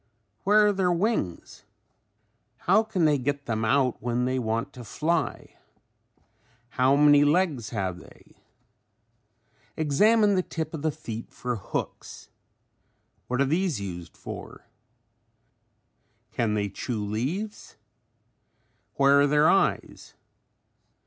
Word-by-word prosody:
Where 210 +2 +5
are 205 - +3
their 190 -2 +1
wings? 175 - -2 1.0
How - - +5
can 220 -6 -1
they 150 -2 +3
get 140 +2 -2
them 110 -1 -2
out 130 +2 +1
when 120 +1 -1
they 130 +1 0
want 115 -1 -2
to 125 - -10
fly? 160 +8 -2 1.1
How 130 +2 +2
many 145 0 +6
legs 145 - +1
have 95 -5 -3
they? - - -18 1.4
Examine 205 +8 +3
the 185 - +2
tip 160 -3 -5
of 160 - -5
the 155 - +1
feet 115 -6 -7
for 125 -1 -4
hooks. 95 - -6 1.0
What 125 +2 -1
are - - +4
these 165 - 0
used 90 -4 -7
for? - - -9 1.7
Can 110 -2 0
they 100 -1 0
chew 110 0 -4
leaves? 150 - -4 1.2
Where 140 +1 +5
are 145 - +4
their 150 +2 +4
eyes? 195 - 0
140 Hz, 115 wpm, -26 LUFS, 115-170 Hz, 1.7 s, many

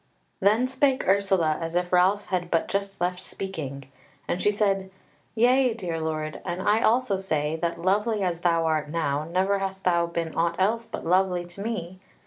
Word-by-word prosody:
Then 215 +6 +3
spake 265 0 +1
Ursula 190 -5 +2
as 165 +1 -4
if 180 0 -1
Ralph 190 +3 +3
had 180 -2 -2
but 165 - +1
just 200 0 -3
left 180 +1 -1
speaking; 145 -10 -6 0.4
and 180 - -1
she - - +3
said: 195 -2 0 0.5
"Yea, 250 +1 +4
dear 175 -7 -4
lord, 155 -1 -3
and 175 -1 -3
I 210 +3 +2
also 235 -3 +2
say, 155 -5 -1
that, 170 +1 -2
lovely 205 +4 +1
as 175 -2 -1
thou 170 -1 +2
art 155 -2 0
now, 150 -2 -1
never 190 +4 +1
hast 195 0 -4
thou 170 -1 +2
been 170 -1 -3
aught 170 0 +1
else 225 +5 +1
but - - -7
lovely 180 0 +2
to 175 +3 -9
me. 185 -5 -4
185 Hz, 180 wpm, -26 LUFS, 170-200 Hz, 0.5 s, Yea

